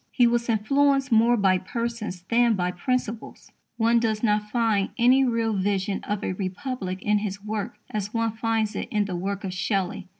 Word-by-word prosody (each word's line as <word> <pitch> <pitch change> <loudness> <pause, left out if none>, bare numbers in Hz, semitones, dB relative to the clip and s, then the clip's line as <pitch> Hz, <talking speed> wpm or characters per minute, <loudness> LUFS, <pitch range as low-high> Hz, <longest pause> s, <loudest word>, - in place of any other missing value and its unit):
He 245 - +3
was 235 0 +1
influenced 275 +5 +2
more 230 +2 +5
by 190 -3 +3
persons 230 -3 -4
than 235 +3 +3
by 180 -1 -1
principles. 230 +3 -4 0.3
One 230 +1 +3
does 220 -1 -1
not 210 -1 +1
find 220 -4 +1
any 255 +3 +5
real 230 -3 +1
vision 195 0 -1
of 205 0 -3
a - - -1
Republic 190 0 -4
in 210 0 +2
his 200 -1 -5
work 210 -1 -4 0.2
as 210 -1 -3
one 230 -1 0
finds 225 -1 -1
it - - -3
in 210 -1 +1
the 190 -2 -4
work 195 +3 -3
of 190 -2 -4
Shelley. 190 -1 -2
215 Hz, 185 wpm, -25 LUFS, 195-235 Hz, 0.3 s, more